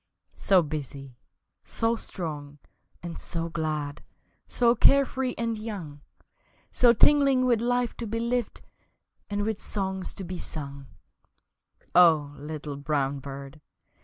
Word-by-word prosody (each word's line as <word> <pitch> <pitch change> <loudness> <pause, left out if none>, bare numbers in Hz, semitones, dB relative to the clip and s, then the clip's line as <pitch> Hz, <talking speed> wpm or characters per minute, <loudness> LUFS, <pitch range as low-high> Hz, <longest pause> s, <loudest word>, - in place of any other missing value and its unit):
So 190 -3 +3
busy, 140 -3 -6 0.5
so 225 +1 0
strong 150 -9 -6 0.5
and 170 -1 -6
so 165 -1 -4
glad, 155 -3 -3 0.5
So 235 -1 +3
care 275 +2 +5
free 260 -1 -3
and 230 -1 -1
young, 185 -10 -6 0.7
So 245 -1 +6
tingling 275 +1 +5
with 240 -3 +3
life 245 0 0
to 235 - -4
be 225 +2 -2
lived 235 0 -1 0.7
And 205 0 -1
with 220 -1 -2
songs 190 -2 -3
to 195 - -5
be 180 0 -5
sung, 140 -4 -5 1.1
O 160 -5 +5
little 150 -1 -6
brown 140 -1 -1
bird! 140 +2 -9
175 Hz, 125 wpm, -27 LUFS, 145-230 Hz, 1.1 s, So